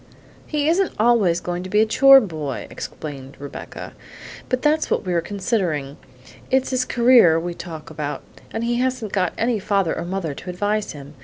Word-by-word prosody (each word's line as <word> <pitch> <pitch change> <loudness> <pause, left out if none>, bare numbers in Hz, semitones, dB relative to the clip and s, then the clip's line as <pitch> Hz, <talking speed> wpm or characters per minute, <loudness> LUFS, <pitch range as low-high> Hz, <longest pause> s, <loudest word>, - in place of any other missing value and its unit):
"He 300 -1 -1
isn't 355 +3 +2
always 215 -7 +3
going 175 0 -4
to 185 - -7
be 210 - +2
a 220 - +5
chore 275 +5 +7
boy," 155 - -4
explained 140 -3 -8
Rebecca, 140 0 -8 0.6
"and 255 - +1
that's 310 +1 +2
what - - 0
we're 175 -2 +1
considering. 170 - -2 0.5
It's 265 0 +1
his 255 -1 +1
career 235 -11 +5
we 175 +1 -4
talk 165 -3 -9
about, 150 -1 -4 0.3
and 225 - -3
he 240 0 0
hasn't 250 -4 -2
got 185 -3 +1
any 230 -1 0
father 195 -4 0
or - - -4
mother 175 -4 -3
to 180 - -9
advise 205 +3 -1
him. 145 0 -11
195 Hz, 175 wpm, -22 LUFS, 165-240 Hz, 0.6 s, chore